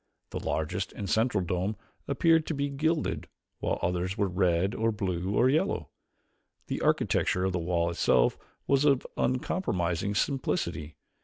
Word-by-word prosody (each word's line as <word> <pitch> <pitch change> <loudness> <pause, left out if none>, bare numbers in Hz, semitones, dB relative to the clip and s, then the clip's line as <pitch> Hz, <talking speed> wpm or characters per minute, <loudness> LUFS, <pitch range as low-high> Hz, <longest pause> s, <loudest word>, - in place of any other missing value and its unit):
The - - -3
largest 90 +5 -2
and 100 - -5
central 110 -2 +2
dome 90 +4 -1 0.3
appeared 165 +3 +3
to 160 - -1
be 140 0 -1
gilded, 155 +3 -1 0.3
while - - -1
others 90 +2 -1
were 100 - +2
red, 90 +1 +1
or 115 0 +1
blue, 95 -2 -2
or 125 - +4
yellow. 145 +5 0 0.7
The - - -3
architecture 90 - +2
of 95 - 0
the 90 - 0
wall 85 0 0
itself - - +3 0.3
was 140 0 +3
of 140 -3 +3
uncompromising 100 - 0
simplicity. 95 - -1
100 Hz, 145 wpm, -29 LUFS, 90-130 Hz, 0.7 s, or